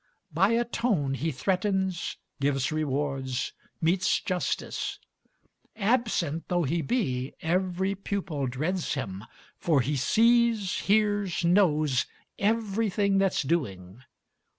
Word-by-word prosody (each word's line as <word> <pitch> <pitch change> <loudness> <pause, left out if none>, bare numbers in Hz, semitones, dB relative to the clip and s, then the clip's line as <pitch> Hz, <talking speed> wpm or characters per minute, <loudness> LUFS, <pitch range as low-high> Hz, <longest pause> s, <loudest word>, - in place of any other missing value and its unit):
By 195 +8 +3
a 235 +1 +2
tone 210 - 0
he 160 +4 -1
threatens, 190 +4 -1 0.2
gives 135 -1 +1
rewards, 140 -4 -2 0.3
metes 180 +3 +2
justice. 185 -5 -2 0.8
Absent 210 - 0
though 175 -1 +1
he 165 +4 0
be, 135 - -1
every 185 +3 0
pupil 185 -8 -3
dreads 155 +9 -2
him, 100 -7 -4 0.4
For 155 -6 +3
he 145 +5 -1
sees, 225 - +3
hears, 205 -4 +2
knows, 155 -8 +3 0.3
everything 205 -2 +1
that's 195 -1 +2
doing. 110 - -2
175 Hz, 105 wpm, -27 LUFS, 140-200 Hz, 0.8 s, By